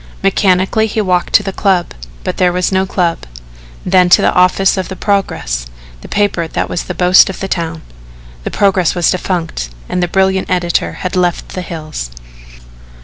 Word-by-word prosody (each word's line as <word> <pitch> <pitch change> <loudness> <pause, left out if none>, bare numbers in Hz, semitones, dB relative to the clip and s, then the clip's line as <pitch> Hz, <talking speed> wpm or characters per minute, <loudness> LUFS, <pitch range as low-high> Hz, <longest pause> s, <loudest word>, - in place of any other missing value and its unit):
Mechanically 195 +2 +2
he 220 - -3
walked 180 -4 0
to - - +5
the 195 -1 -4
Club, 190 -4 0 0.3
but - - -3
there 180 -1 +3
was 180 +1 0
no 190 0 +1
club 175 -3 0 0.7
then 180 -1 +4
on - - -2
to - - +6
the - - +3
office 185 +1 +3
of 190 -1 -3
The 190 - -6
Progress 75 - -1 0.3
the - - -10
paper 200 -5 0
that - - -2
was 175 - -3
the 180 - -5
boast 180 +2 +5
of 190 - -6
the 195 - -3
town. 165 -3 -3 0.6
The - - -3
Progress 190 -4 +1
was 175 -1 +2
defunct 170 - -3 0.2
and 180 - -2
the 175 - +1
brilliant 190 +1 +1
editor 175 -2 0
had 180 - -2
left 180 -2 0
the 185 - -5
hills. 155 - -6
180 Hz, 185 wpm, -14 LUFS, 175-190 Hz, 0.7 s, to